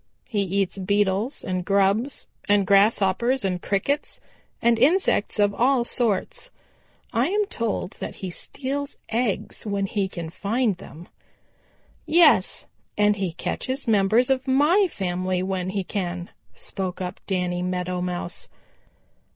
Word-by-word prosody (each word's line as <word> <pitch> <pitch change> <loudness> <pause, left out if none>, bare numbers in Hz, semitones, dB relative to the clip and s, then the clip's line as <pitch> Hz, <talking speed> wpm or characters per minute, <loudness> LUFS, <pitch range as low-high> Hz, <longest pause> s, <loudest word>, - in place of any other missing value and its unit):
He 210 -4 -1
eats 195 0 -1
Beetles 200 +5 0
and 185 -1 -2
grubs 200 +7 +1 0.2
and 205 -1 +4
Grasshoppers 205 +4 +3
and 180 -2 -1
Crickets 280 +9 -1 0.4
and 235 -1 +3
insects 290 - +3
of 205 -1 +3
all 250 +3 +3
sorts. 230 -6 -1 0.6
I 235 +4 +2
am 415 +3 +1
told 230 - -3
that - - -5
he 190 -2 -6
steals 280 +8 -4
eggs 230 -3 -1
when 200 -2 -1
he 195 0 -1
can 170 -3 -6
find 210 +3 0
them." 170 -1 -12 1.0
"Yes, 340 +2 +4 0.3
and 210 0 +3
he 190 -4 -2
catches 260 - -3
members 220 +4 +3
of 265 0 0
my 300 +10 +4
family 185 - -2
when 185 -1 -2
he 195 0 -2
can," 180 -2 -4 0.2
spoke 185 -2 -5
up 180 -1 -5
Danny 180 -2 -1
Meadow 180 0 -2
Mouse. 180 0 -4
200 Hz, 130 wpm, -24 LUFS, 185-245 Hz, 1.0 s, and